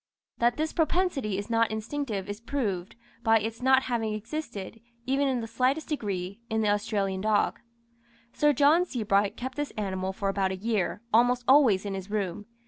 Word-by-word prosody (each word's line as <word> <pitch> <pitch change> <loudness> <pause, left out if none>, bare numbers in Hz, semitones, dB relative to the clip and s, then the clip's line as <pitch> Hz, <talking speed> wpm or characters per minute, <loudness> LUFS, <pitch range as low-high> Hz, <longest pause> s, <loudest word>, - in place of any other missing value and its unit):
That 240 0 +2
this 310 +1 -1
propensity 320 - 0
is 200 - -4
not 230 -1 +2
instinctive 220 -2 -3
is 205 +2 -6
proved, 215 -9 -3 0.3
by 225 -1 +4
its 225 +2 -5
not 265 +1 +4
having 225 -3 -1
existed, 225 -3 -6 0.2
even 275 +2 +1
in 255 -3 0
the 225 - -5
slightest 255 +7 0
degree, 200 - -3
in 220 0 0
the 210 - +2
Australian 205 -2 0
dog. 215 0 +1 0.7
Sir 295 0 +3
John 290 +5 +4
Sebright 210 - 0
kept 260 +2 -5
this 290 -1 -2
animal 190 -2 -2
for 200 +1 -3
about 195 -1 0
a - - -2
year, 210 +1 -1
almost 245 +2 +4
always 255 -9 +5
in 200 - -3
his 190 0 -6
room. 205 -1 -3
225 Hz, 175 wpm, -28 LUFS, 200-260 Hz, 0.7 s, always